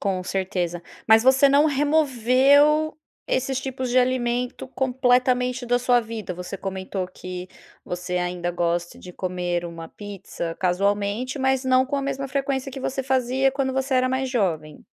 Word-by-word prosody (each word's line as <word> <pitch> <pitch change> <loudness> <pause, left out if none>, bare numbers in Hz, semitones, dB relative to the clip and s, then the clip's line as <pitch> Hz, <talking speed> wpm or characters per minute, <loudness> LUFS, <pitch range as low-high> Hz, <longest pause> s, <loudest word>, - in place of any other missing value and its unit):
Com 190 -2 -1
certeza, 180 -3 -2 0.2
mas 220 0 +6
você 265 +2 +5
não 285 +2 +5
removeu 285 +1 +3 0.3
esses 265 0 -1
tipos 260 -1 -4
de 245 +1 +3
alimento 250 -1 0
completamente 250 -1 +1
da 245 0 +2
sua 245 0 +3
vida? 220 -4 -6
Você 180 +2 -6
comentou 190 0 -4
que 180 0 -8 0.4
você 180 0 -4
ainda 180 0 -2
gosta 175 0 -2
de 180 - -11
comer 180 -1 -2
uma 165 -1 -7
pizza 195 -5 -7
casualmente, 200 +7 0
mas 265 0 +1
não 260 0 +3
com 280 - -3
a 275 - -1
mesma 275 0 -3
frequência 270 0 -2
que 270 - -7
você 270 +1 -2
fazia 265 0 +1
quando 270 -1 -1
você 265 +1 -1
era 255 0 +3
mais 260 +1 -1
jovem? 165 - -2
245 Hz, 155 wpm, -23 LUFS, 185-265 Hz, 0.4 s, mas